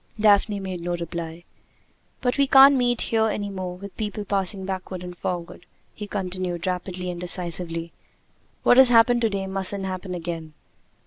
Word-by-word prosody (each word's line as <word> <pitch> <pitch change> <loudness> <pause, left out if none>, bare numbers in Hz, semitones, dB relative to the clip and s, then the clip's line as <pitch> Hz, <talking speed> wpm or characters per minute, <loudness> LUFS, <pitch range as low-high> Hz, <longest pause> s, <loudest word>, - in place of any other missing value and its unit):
Daphne 205 -1 +3
made 185 -2 -5
no 175 0 -2
reply. 170 0 -6 0.8
"But 250 +2 -1
we 280 - +4
can't 270 +1 +8
meet 245 -2 +2
here 220 -1 +1
any 205 -2 -3
more 185 -2 -5
with 200 +1 -10
people 210 -1 -4
passing 195 -1 0
backward 185 -1 -5
and 180 0 -8
forward!" 175 0 -5 0.3
he 210 - -7
continued 185 -3 -4
rapidly 180 0 -3
and 175 0 -7
decisively. 170 -2 -2 0.7
"What 245 - +5
has 265 -1 +8
happened 240 0 +5
to 225 - +2
day 195 -2 -3
mustn't 195 0 +1
happen 185 0 -5
again." 165 -2 -6
190 Hz, 165 wpm, -24 LUFS, 175-210 Hz, 0.8 s, can't